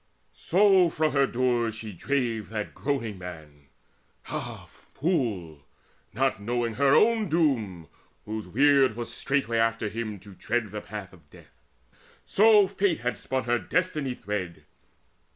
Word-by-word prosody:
So 190 -1 +4
from 155 -1 0
her 140 -1 +3
doors 120 -3 0
she 110 -1 -7
drave 115 -1 -2
that 105 -1 -4
groaning 115 -8 -3
man 75 -5 -10 0.6
Ah - - -5
fool! 105 - -3 0.5
not 100 - 0
knowing 120 +1 -1
her 140 +4 +3
own 220 -3 +3
doom, 115 - 0 0.4
whose 110 -2 -5
weird 135 +3 +4
Was 120 0 -5
straightway 130 -5 0
after 115 -1 +1
him 110 -2 -5
to 100 -1 -13
tread 115 +1 -2
the 105 0 -5
path 100 0 -8
Of 80 -5 -19
death! - - -19 0.6
So 210 0 +6
Fate 195 -5 0
had 125 +1 -1
spun 130 -1 -3
her 120 0 +1
destiny 150 -8 -1
thread. 95 -7 -5
115 Hz, 135 wpm, -27 LUFS, 105-140 Hz, 0.6 s, So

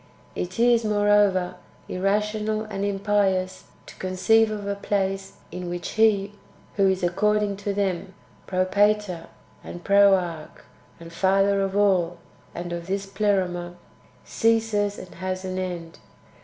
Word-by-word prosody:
It 180 +1 -5
is, 235 0 +4
moreover, 205 -3 +2 0.3
irrational 210 +3 -1
and 210 -2 -5
impious 195 -2 0 0.2
to - - -12
conceive 220 +4 +2
of 210 -1 -5
a 200 - -1
place 195 -1 -2 0.2
in 180 +1 -5
which 175 0 -4
He 210 -2 +2 0.4
who 195 -1 +3
is, 190 -1 -1
according 205 +3 +1
to 205 0 -3
them, 195 -1 -2 0.3
Propator, 185 -1 +1 0.4
and 175 - -9
Proarche, 190 -5 +2 0.4
and 165 0 -11
Father 195 +2 +2
of 195 0 -1
all, 180 -4 +2 0.4
and 175 0 -5
of 170 0 -6
this 195 +1 -2
Pleroma, 190 -3 -1 0.5
ceases 225 -3 +1
and 180 - -10
has 185 +1 -4
an 185 0 -3
end. 175 -3 -5
195 Hz, 130 wpm, -24 LUFS, 185-205 Hz, 0.5 s, is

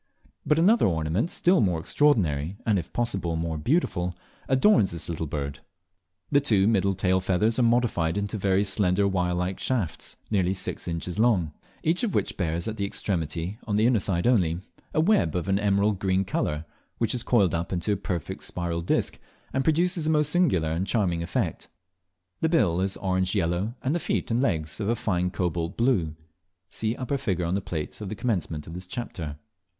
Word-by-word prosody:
But 150 - +4
another 195 - +5
ornament 80 - 0
still 180 +1 +3
more 90 -5 +1
extraordinary, 90 - +1
and 105 -5 +3
if 80 - -8
possible 95 -8 -1
more 80 -1 -2
beautiful, 90 - 0 0.3
adorns 130 - +4
this 85 -1 -4
little 80 -1 -3
bird. 70 -1 -4 0.7
The 140 - +5
two 105 -8 +3
middle 100 -3 +2
tail 95 0 +2
feathers 100 +6 +1
are - - +4
modified 115 -8 +2
into 100 +2 -2
very 95 -1 +2
slender 100 -1 +2
wirelike 90 -1 -1
shafts, 105 -12 -2 0.2
nearly 95 -2 +2
six 95 - -3
inches 85 +3 -3
long, 100 -10 +2 0.3
each 165 +3 +1
of 230 -5 -1
which - - 0
bears 85 0 -1
at 110 0 -4
the 100 - -1
extremity, 85 0 -3
on 105 - 0
the 110 +2 +3
inner 120 -2 +4
side 90 -3 0
only, 90 -9 +2 0.3
a - - 0
web 195 - +3
of 90 -2 -2
an 95 0 +2
emerald 100 -1 +2
green 95 0 +1
colour, 75 -3 -2 0.3
which 115 -2 0
is 125 - -2
coiled 105 -7 +3
up 85 +1 -2
into 90 +3 -1
a - - +3
perfect 90 -4 -4
spiral 85 -1 -2
disc, 85 - 0 0.3
and 135 - +1
produces 165 +1 +1
a - - +2
most 150 -2 +2
singular 95 - +2
and 85 +4 -1
charming 90 -7 +1
effect. 85 - -2 0.7
The 160 - +1
bill 95 - +2
is 95 0 -1
orange 95 0 0
yellow, 95 +5 0
and 135 - +1
the 175 - 0
feet - - -2
and 115 +2 +2
legs 80 - -1
of 105 0 -1
a 120 - +2
fine 90 -5 0
cobalt 85 -1 -2
blue. 100 -11 +1 0.5
(See 110 +1 -2
upper 135 +2 -2
figure 95 -10 -1
on 85 - -1
the 100 - 0
plate 80 +2 -5
at 100 - -4
the 110 - -4
commencement 85 -9 -2
of 80 - -9
this 90 +1 -7
chapter.) 85 -9 -5
95 Hz, 190 wpm, -26 LUFS, 85-115 Hz, 0.7 s, another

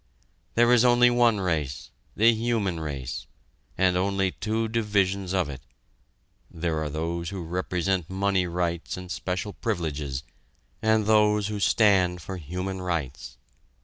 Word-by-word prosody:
There 120 +1 +5
is 120 -1 +5
only 120 0 +5
one 120 -3 +3
race 75 -7 -2 0.2
the 115 +2 +5
human 110 -6 -1
race 70 -5 -5 0.5
and 95 -1 +3
only 95 0 +1
two 110 +3 -2
divisions 100 -4 0
of 95 -4 +1
it; 65 -2 -7 0.9
there 80 -1 -2
are 75 - -2
those 85 +3 -3
who 95 -3 -5
represent 90 +1 -1
money 95 -1 +1
rights 85 0 -2
and 90 -1 -8
special 95 +3 -3
privileges, 75 - -3 0.6
and 110 -1 +2
those 105 -1 +3
who 105 -1 -3
stand 95 -4 +3
for 95 +3 -6
human 90 +4 -4
rights. 75 -11 -4
95 Hz, 135 wpm, -26 LUFS, 85-105 Hz, 0.9 s, There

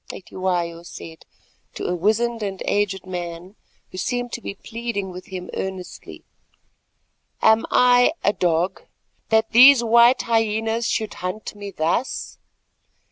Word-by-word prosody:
Cetywayo 175 -3 -3
said, 165 -1 -11 0.5
to - - -5
a 180 - -1
wizened 225 +5 0
and 195 -2 -4
aged 195 -2 -1
man 175 +1 -7 0.4
who 185 - -7
seemed 245 +3 -2
to 240 - -5
be 200 - -6
pleading 225 -3 -5
with 180 0 -10
him 185 -1 -7
earnestly; 190 -1 -7 1.2
"am 220 +1 +4
I 245 +3 +4
a 205 - +3
dog 175 +1 0 0.5
that 220 0 +2
these 250 +1 +8
white 235 +2 +5
hyenas 225 0 0
should 220 -2 -2
hunt 185 +4 -5
me 205 -1 -8
thus? 175 +8 -2
205 Hz, 130 wpm, -22 LUFS, 180-230 Hz, 1.2 s, these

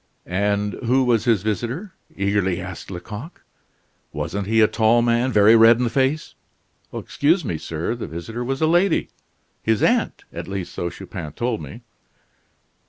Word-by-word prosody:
"And 100 +3 0
who 130 +3 +3
was 120 -3 +2
his 115 -6 +2
visitor?" 120 - -3 0.2
eagerly 100 -2 0
asked 90 -1 -7
Lecoq, 105 - -8 0.7
"wasn't 100 0 -3
he 110 +1 +2
a 110 - +6
tall 115 +2 +3
man; 120 +2 +2
very 105 0 +6
red 115 +1 +7
in 125 - 0
the 120 - 0
face 135 +3 0 0.3
" - - -42
"Excuse 160 +3 0
me, 85 -8 -2
sir, 80 +7 -3
the 120 - -5
visitor 100 +10 -5
was 135 +4 -2
a - - +6
lady 175 +4 +2 0.5
his 110 -1 +1
aunt, - - +1
at - - -6
least 95 -2 -5
so 85 - -3
Chupin 85 -4 -8
told 120 +2 -2
me." 115 - -9
110 Hz, 165 wpm, -22 LUFS, 100-125 Hz, 0.7 s, red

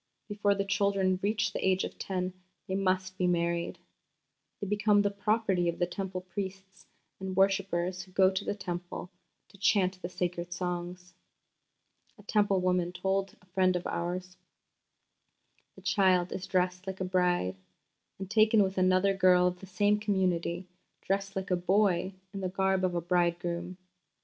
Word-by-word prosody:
Before 205 -1 +1
the 200 0 -1
children 195 -2 +1
reach 210 0 0
the - - -3
age 190 0 +2
of - - -6
ten 185 -1 -2 0.3
they 190 - -3
must 185 -1 0
be 180 - +2
married.... 170 0 0 0.8
They - - -3
become 210 0 +3
the 205 - +1
property 200 -3 +1
of 170 - -3
the 175 - +2
Temple 185 0 -4
priests 190 +1 -7 0.3
and 190 -1 -4
worshippers 190 -2 +1
who 185 0 -13
go 190 0 +4
to 190 +1 -2
the - - -2
Temple 175 -1 -6 0.4
to 200 - -18
chant 185 -2 +2
the 175 - -4
sacred 175 -1 -3
songs." 180 0 -4 1.0
A 205 - -16
Temple 205 -2 +2
woman 180 -1 +2
herself 180 0 -10
told 195 0 0
a - - -22
friend 185 0 +2
of 180 - -2
ours: 180 +1 -3 1.4
"The - - -14
child 185 -3 +3
is 185 - -5
dressed 180 0 0
like 190 0 -5
a 185 - -1
bride, 180 - +1 0.6
and 190 - -6
taken 215 +1 +5
with 190 0 -1
another 185 +1 +3
girl 180 -1 +5
of 180 0 0
the 190 - -11
same 205 +3 +2
community, 185 -4 0 0.4
dressed 195 +1 -1
like 190 0 -3
a - - +4
boy 185 0 +1 0.2
in 195 - -5
the 185 - -1
garb 190 0 +1
of 180 -1 +1
a 170 - 0
bridegroom. 175 0 -1
185 Hz, 165 wpm, -30 LUFS, 180-195 Hz, 1.4 s, taken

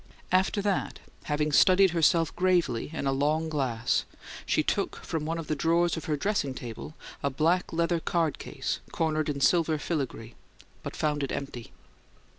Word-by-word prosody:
After 190 +2 +2
that, 200 -2 -1 0.3
having 150 0 0
studied 185 +5 +6
herself 165 -1 +3
gravely 175 -11 +1
in 160 - -4
a 135 - +2
long 150 +4 +1
glass, 125 -6 0 0.4
she - - +2
took - - -1
from 155 -2 -2
one 165 +2 -2
of 165 - -5
the 155 - -1
drawers 170 +3 +2
of 160 - -6
her 150 -2 0
dressing 145 -6 -1
table 120 +6 -7 0.3
a 140 - +1
black 165 +7 +1
leather 170 +1 +1
card 165 -2 0
case - - -4
cornered 155 -2 0
in 140 -1 -3
silver 165 0 +3
filigree, 135 -7 -4 0.5
but - - -6
found 150 -1 0
it 140 - -2
empty. 135 -4 -5
155 Hz, 165 wpm, -28 LUFS, 140-170 Hz, 0.5 s, studied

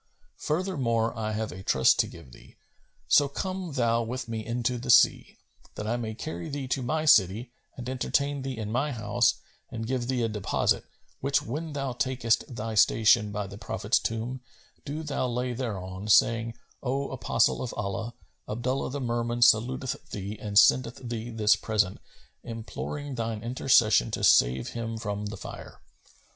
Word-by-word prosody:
Furthermore 135 -10 0
I 110 -1 -3
have 110 0 -3
a 95 - -8
trust 65 -8 +3
to - - +3
give 65 - -13
thee; - - -16 0.5
so 145 - +5
come 185 +2 -4
thou 115 -3 +2
with 125 +2 -4
me 115 -1 -4
into 120 +2 -1
the 125 - -7
sea, 120 - +4 0.4
that 105 - -5
I 115 +2 0
may 110 -2 -4
carry 85 -4 -6
thee 140 -2 -4
to 130 - 0
my 155 +5 -1
city 110 - +4 0.3
and 125 -1 -6
entertain 140 +2 0
thee 130 -2 -4
in 110 -1 -4
my 135 +5 0
house 115 +1 +2 0.3
and 115 0 -5
give 125 0 -2
thee 125 -2 0
a - - +2
deposit; 105 -3 0 0.3
which 140 +1 +1
when 155 +6 -5
thou 135 -3 -2
takest 125 -1 0
thy 110 0 -4
station 105 0 +4
by 105 0 -3
the 100 +1 -10
Prophet's 110 - 0
tomb, 115 +3 -3 0.4
do 150 +3 -4
thou 145 -4 -1
lay 125 +1 -2
thereon, 100 -5 -5
saying, 115 +2 +4 0.3
'O 135 +2 -2
apostle 115 -2 +1
of 125 - -3
Allah, 110 +4 -3 0.3
Abdullah 125 +5 -1
the 140 +2 -4
Merman 120 0 0
saluteth 125 +4 +2
thee, 100 +1 -5
and 105 -1 -2
sendeth 125 +2 +5
thee 115 0 -4
this 110 -2 +3
present, 105 -4 0 0.4
imploring 135 +5 -6
thine 115 -3 -3
intercession 115 - +3
to - - -4
save 65 +1 +4
him 115 -1 -4
from 105 -2 -4
the 105 - -6
Fire.'" - - -9
115 Hz, 165 wpm, -27 LUFS, 110-130 Hz, 0.5 s, so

